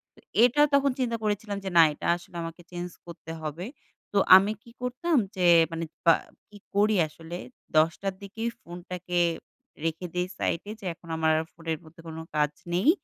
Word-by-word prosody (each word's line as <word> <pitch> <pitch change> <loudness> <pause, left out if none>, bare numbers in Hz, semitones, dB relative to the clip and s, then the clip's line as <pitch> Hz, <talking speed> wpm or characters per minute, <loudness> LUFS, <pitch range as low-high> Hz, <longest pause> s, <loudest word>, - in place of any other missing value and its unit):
তো - - -19 0.2
এটা 250 +4 +5
তখন 280 -1 +4
চিন্তা 235 -2 0
করেছিলাম 205 -1 -1
যে, 190 - -2
না 165 - +10
এটা - - -5
আসলে 175 - -16
আমাকে 165 +1 -7
চেঞ্জ 175 0 -4 0.2
করতে 165 -1 -9
হবে। 155 +4 -4 0.5
তো 205 - +2 0.2
আমি 195 +2 +2
কি 235 - -15
করতাম? 265 +6 0 0.2
যে, 180 -2 +3 0.2
মানে 165 0 -3 0.2
বা 165 - +8 0.4
কি 210 - -13 0.2
করি 210 +1 +4
আসলে? 165 +3 -8 0.4
১০ঃ০০ 165 +5 +2
র - - -17
দিকেই 225 +4 -3
ফোনটাকে 175 0 -4 0.7
রেখে 165 +2 -2
দেই 180 0 0
সাইডে। 185 +5 -1
যে, 195 - -11
এখন 170 - -19
আমার 160 0 +3
আর 160 - -3
ফোনের 165 -1 -3
মধ্যে 165 +2 -15
কোন 160 0 -7 0.2
কাজ 150 -1 +2 0.2
নেই। 190 - +3
180 Hz, 180 wpm, -27 LUFS, 165-210 Hz, 0.7 s, না